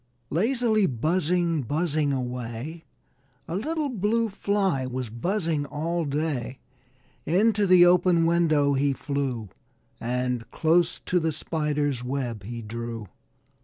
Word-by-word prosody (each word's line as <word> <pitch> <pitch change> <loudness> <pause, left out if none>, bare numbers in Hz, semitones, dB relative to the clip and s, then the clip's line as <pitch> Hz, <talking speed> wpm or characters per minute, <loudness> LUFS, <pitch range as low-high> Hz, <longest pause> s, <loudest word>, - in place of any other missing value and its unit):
Lazily 220 - +2
buzzing, 165 +5 +1
buzzing 150 +2 0
away, 125 +4 -4 0.6
A 165 - -3
little 305 - -1
Blue 225 -1 0
Fly 195 -9 0
was 125 -3 -4
buzzing 160 - -1
all 165 +3 -2
day. 145 -3 -2 0.7
Into 205 +4 +3
the 180 -1 +7
open 175 -1 +4
window 155 -4 +3
he 140 +1 +2
flew 130 -6 -3 0.5
And 125 0 -2
close 165 +2 +2
to 180 - +2
the 160 -1 0
Spider's 150 -4 -1
web 125 -4 -3
he 115 +4 -7
drew. 115 -1 -6
155 Hz, 115 wpm, -26 LUFS, 130-180 Hz, 0.7 s, the